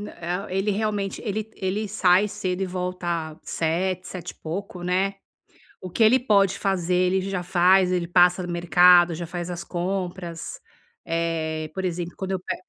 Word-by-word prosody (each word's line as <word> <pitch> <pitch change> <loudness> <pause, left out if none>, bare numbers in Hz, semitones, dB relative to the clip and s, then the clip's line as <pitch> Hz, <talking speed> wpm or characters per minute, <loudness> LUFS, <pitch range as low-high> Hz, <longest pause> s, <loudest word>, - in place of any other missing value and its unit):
nã 205 - -7 0.4
eh, 185 - -3
ele, 195 +2 +1
realmente 205 -1 -2
ele 215 0 -3
ele 200 +2 -2
sai 190 -1 +3
cedo 195 -2 -3
e - - 0
volta 175 -3 -3
19:00, 180 +3 -1
sete 180 -2 -6
e - - -14
pouco, 180 +2 -6
né. 190 +2 0 0.6
O 185 - -7
que 180 - -4
ele 225 +4 +6
pode 200 -5 +3
fazer, 185 -3 0 0.2
ele 190 0 0
já 180 -2 -2
faz, 180 +1 +4
ele 175 -2 0
passa 175 +1 +4
no 175 -1 -5
mercado, 175 0 +5
já 170 +1 -5
faz 175 +1 -5
as 175 -1 -5
compras. 175 -1 -4 0.5
Eh, 160 -1 -2
por 190 -1 -2
exemplo, 175 -1 -3
quando 190 -1 -4
eu 190 - -1
pe 180 - -4
180 Hz, 175 wpm, -24 LUFS, 175-195 Hz, 0.6 s, ele